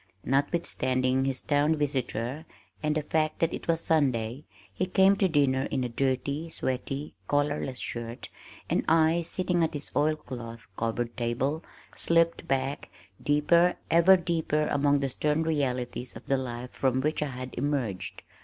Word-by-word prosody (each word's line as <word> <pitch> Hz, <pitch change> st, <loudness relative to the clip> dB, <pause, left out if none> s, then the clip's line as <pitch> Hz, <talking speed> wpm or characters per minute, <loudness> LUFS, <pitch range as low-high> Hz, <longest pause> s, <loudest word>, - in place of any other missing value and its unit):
Notwithstanding 130 Hz, -3 st, +1 dB
his 135 Hz, -1 st, -1 dB
town 150 Hz, +2 st, +2 dB
visitor 135 Hz, -1 st, -2 dB, 0.4 s
and 150 Hz, 0 st, 0 dB
the 155 Hz, -, 0 dB
fact 155 Hz, +1 st, 0 dB
that 165 Hz, -, +1 dB
it -, -, -6 dB
was 165 Hz, -1 st, +2 dB
Sunday, 130 Hz, -5 st, +1 dB, 0.3 s
he 185 Hz, -, -1 dB
came 190 Hz, +1 st, +5 dB
to 195 Hz, -, +3 dB
dinner 135 Hz, -4 st, +2 dB
in 130 Hz, -2 st, -1 dB
a 125 Hz, -, -2 dB
dirty, 135 Hz, +5 st, -1 dB
sweaty, 135 Hz, 0 st, -3 dB
collarless 145 Hz, -2 st, 0 dB
shirt, 120 Hz, -1 st, -5 dB, 0.4 s
and -, -, +1 dB
I, 165 Hz, +1 st, +4 dB
sitting 175 Hz, 0 st, 0 dB
at 160 Hz, -, -1 dB
his 145 Hz, -, -6 dB
oil 155 Hz, +1 st, +3 dB
cloth 120 Hz, -6 st, -8 dB
covered 115 Hz, +2 st, -2 dB
table, 130 Hz, +6 st, -1 dB, 0.3 s
slipped 165 Hz, 0 st, +2 dB
back, 135 Hz, +1 st, -1 dB, 0.3 s
deeper, 170 Hz, +4 st, +3 dB, 0.2 s
ever 170 Hz, +3 st, +7 dB
deeper 165 Hz, -3 st, 0 dB
among 145 Hz, 0 st, +2 dB
the 135 Hz, -, 0 dB
stern 150 Hz, +4 st, 0 dB
realities 130 Hz, -5 st, -2 dB
of -, -, -10 dB
the 135 Hz, -, +2 dB
life 125 Hz, -1 st, -5 dB
from 130 Hz, -1 st, +1 dB
which 155 Hz, +3 st, 0 dB
I 150 Hz, -, 0 dB
had 130 Hz, 0 st, -7 dB
emerged. 120 Hz, -11 st, -2 dB
145 Hz, 155 wpm, -28 LUFS, 130-160 Hz, 0.4 s, ever